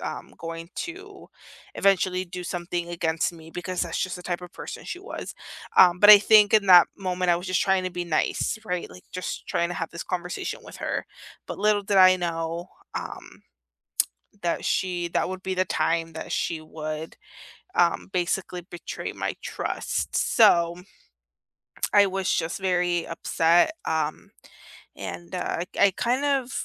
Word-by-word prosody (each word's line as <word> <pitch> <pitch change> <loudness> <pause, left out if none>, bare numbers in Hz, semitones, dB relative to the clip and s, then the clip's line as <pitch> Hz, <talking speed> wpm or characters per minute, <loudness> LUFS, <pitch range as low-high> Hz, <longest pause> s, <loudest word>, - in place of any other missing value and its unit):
um, - - -6
going 165 +1 -7
to 390 +3 -7 0.5
eventually 185 -1 +2
do 180 0 -7
something 175 0 -3
against 165 -1 -1
me 165 -1 -13
because 180 +1 -3
that's 170 -2 -3
just 185 - -1
the 180 - -10
type 180 0 -3
of 180 0 -10
person - - -8
she 360 - -6
was, 415 - -7 0.4
um, 180 -1 +7
but 205 - +6
I 210 - +12
think 210 0 +6
in 210 -2 +4
that 180 -2 +9
moment, 180 -2 -1
I - - +3
was 175 +2 -6
just 185 - +1
trying 190 -1 +2
to 185 - -2
be 175 0 -4
nice, 170 +5 0
right? 180 -4 -3
Like 90 +1 -13
just 185 0 -5
trying 170 - 0
to - - -3
have 165 0 -4
this 170 - -7
conversation 180 -1 -4
with - - -11
her. - - -3 0.4
But - - -6
little 210 -1 +2
did 200 0 0
I 185 -1 +8
know, 170 -1 -3 0.3
um, - - -7 1.0
that 170 -1 -1
she 175 -2 0
that - - 0
would 185 0 -6
be 190 - -2
the 185 0 +2
time 165 -1 0
that 160 - -6
she 165 - -1
would, 155 0 -6 0.6
um, 175 +2 +2
basically 180 0 -1
betray 175 0 -7
my - - -3
trust, - - -3
so 170 -7 +4 1.2
I 205 -1 +7
was 190 0 -2
just 160 +4 -1
very 180 -2 0
upset, 165 - +3
um, 155 -1 -2 0.6
and 175 +1 -7
I 175 -1 -2
I 200 - +6
kind 250 +3 +1
of 270 -3 +1
180 Hz, 165 wpm, -25 LUFS, 170-190 Hz, 1.2 s, I